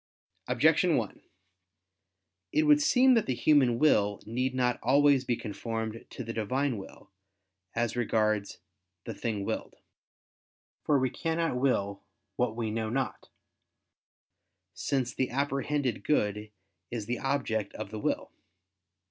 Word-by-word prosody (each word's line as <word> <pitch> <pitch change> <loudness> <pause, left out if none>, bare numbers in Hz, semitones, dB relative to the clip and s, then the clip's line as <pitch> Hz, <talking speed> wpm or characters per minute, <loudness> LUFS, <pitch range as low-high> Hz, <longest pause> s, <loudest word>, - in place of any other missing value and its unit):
Objection - - +3
1: - - -4 1.3
It 310 - +3
would 300 -1 +5
seem 265 -3 +5
that 230 -3 +2
the 130 - 0
human 130 -4 +4
will 105 -8 +3
need 125 +4 -1
not 125 -1 +1
always 140 +2 +4
be 120 - +1
conformed 110 +1 -5
to 125 - -7
the 115 0 -5
Divine 125 +3 -1
will, 95 0 -13 0.6
as 115 0 0
regards 110 -3 0 0.5
the - - -5
thing 105 -4 -3
willed. - - -4 1.1
For 145 - +2
we 130 -2 +1
cannot 165 -3 -1
will 100 -7 0 0.3
what 120 -3 0
we 115 -2 -2
know 110 0 -2
not: 130 +2 -3 1.4
since 130 -3 -1
the 130 - -1
apprehended 140 0 -1
good 105 -6 0 0.4
is 115 -3 -4
the 120 +3 -2
object 125 -7 -1
of 110 -2 -6
the 110 - -5
will. - - -2
120 Hz, 130 wpm, -29 LUFS, 110-140 Hz, 1.4 s, would